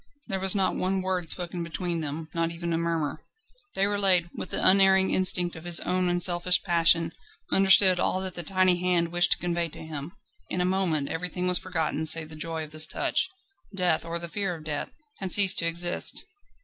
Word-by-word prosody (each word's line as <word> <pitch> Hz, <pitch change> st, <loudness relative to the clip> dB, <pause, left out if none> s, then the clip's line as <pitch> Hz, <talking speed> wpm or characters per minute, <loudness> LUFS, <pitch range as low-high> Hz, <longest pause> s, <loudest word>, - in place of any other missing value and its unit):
There 195 Hz, -, -4 dB
was 190 Hz, +1 st, +7 dB
not 195 Hz, -2 st, 0 dB
one 190 Hz, 0 st, -1 dB
word 185 Hz, -3 st, -4 dB
spoken 175 Hz, +1 st, -2 dB
between 170 Hz, 0 st, -4 dB
them, 155 Hz, +1 st, -6 dB
not 165 Hz, 0 st, -2 dB
even 170 Hz, 0 st, -5 dB
a -, -, -1 dB
murmur. 165 Hz, -3 st, -3 dB, 0.6 s
Déroulède, 195 Hz, -3 st, +2 dB
with -, -, -7 dB
the -, -, 0 dB
unerring 190 Hz, 0 st, +3 dB
instinct 180 Hz, -2 st, +2 dB
of 160 Hz, -, -11 dB
his 175 Hz, -1 st, +3 dB
own 180 Hz, 0 st, -1 dB
unselfish 175 Hz, 0 st, +2 dB
passion, 165 Hz, -2 st, +3 dB, 0.4 s
understood 190 Hz, -1 st, +4 dB
all 185 Hz, -, -1 dB
that 190 Hz, -1 st, -5 dB
the 175 Hz, -, -5 dB
tiny 185 Hz, +1 st, 0 dB
hand 175 Hz, -2 st, -1 dB
wished 175 Hz, +1 st, +3 dB
to -, -, -6 dB
convey 170 Hz, -1 st, -3 dB
to 160 Hz, -, -11 dB
him. 155 Hz, +1 st, -8 dB, 0.4 s
In 180 Hz, -, -4 dB
a 180 Hz, -, 0 dB
moment 180 Hz, -6 st, -1 dB
everything 180 Hz, +2 st, -4 dB
was 180 Hz, 0 st, +6 dB
forgotten 160 Hz, -3 st, -3 dB
save 155 Hz, 0 st, +1 dB
the 155 Hz, -, -10 dB
joy 160 Hz, +1 st, -5 dB
of 155 Hz, -, -12 dB
this 155 Hz, 0 st, +3 dB
touch. -, -, -1 dB, 0.5 s
Death, 180 Hz, -4 st, 0 dB
or 165 Hz, 0 st, -4 dB
the 170 Hz, 0 st, -6 dB
fear 195 Hz, -1 st, -4 dB
of 160 Hz, -, -13 dB
death, 150 Hz, -2 st, -5 dB, 0.3 s
had 190 Hz, -2 st, -5 dB
ceased 195 Hz, -2 st, +7 dB
to 170 Hz, -, +1 dB
exist. 175 Hz, +1 st, -2 dB
175 Hz, 200 wpm, -25 LUFS, 165-185 Hz, 0.6 s, was